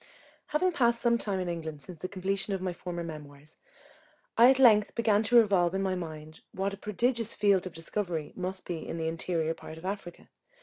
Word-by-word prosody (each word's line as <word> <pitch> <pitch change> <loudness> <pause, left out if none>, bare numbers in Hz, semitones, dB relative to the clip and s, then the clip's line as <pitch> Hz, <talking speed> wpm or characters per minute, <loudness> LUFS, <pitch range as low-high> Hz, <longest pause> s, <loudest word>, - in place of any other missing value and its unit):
Having 360 +5 +1
passed 235 -7 +2
some 235 -1 +2
time 200 -4 -1
in 180 - -2
England 160 -4 -5
since 170 +2 -10
the 185 - -4
completion 195 +1 -1
of 190 - -5
my 185 -1 -2
former 175 0 -5
memoirs, 150 -2 -10 0.8
I 240 +2 +8
at 265 - +5
length 220 -6 +5
began 220 -3 +3
to 225 +2 +4
revolve 190 -6 +4
in 195 - 0
my 190 -1 0
mind 155 -3 -7
what 195 +1 -2
a - - -7
prodigious 230 +3 -1
field 195 -3 +3
of 180 - -9
discovery 165 -2 -3
must 185 +1 -4
be 175 -2 -4
in - - -4
the 160 -1 -2
interior 165 0 -1
part 160 -1 -10
of 165 - -11
Africa. 190 -3 -6
185 Hz, 205 wpm, -29 LUFS, 165-210 Hz, 0.8 s, I